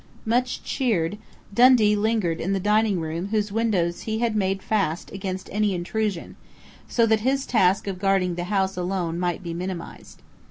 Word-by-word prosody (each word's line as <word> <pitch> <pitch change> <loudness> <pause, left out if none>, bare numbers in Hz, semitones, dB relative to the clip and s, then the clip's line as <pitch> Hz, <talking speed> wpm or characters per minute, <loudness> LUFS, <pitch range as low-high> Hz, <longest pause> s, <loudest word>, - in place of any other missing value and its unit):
Much 245 +3 0
cheered, 210 -7 -1 0.3
Dundee 235 -2 +6
lingered 210 -6 0
in 190 +4 -1
the 195 - 0
dining 210 0 +2
room 165 +3 -3
whose 210 -1 -1
windows 200 -6 0
he 220 0 -2
had 230 -1 0
made 195 -2 0
fast 190 -6 -1
against 190 -1 -5
any 210 -2 +1
intrusion, 195 +1 -3 0.5
so 230 - +2
that 220 -1 +3
his 265 +4 0
task 195 -5 +2
of 195 -2 -4
guarding 195 -2 +2
the 175 0 -4
house 195 0 0
alone 180 -2 -2
might 180 +1 -2
be 170 -1 -4
minimized. 180 0 -7
195 Hz, 165 wpm, -24 LUFS, 180-220 Hz, 0.5 s, Dundee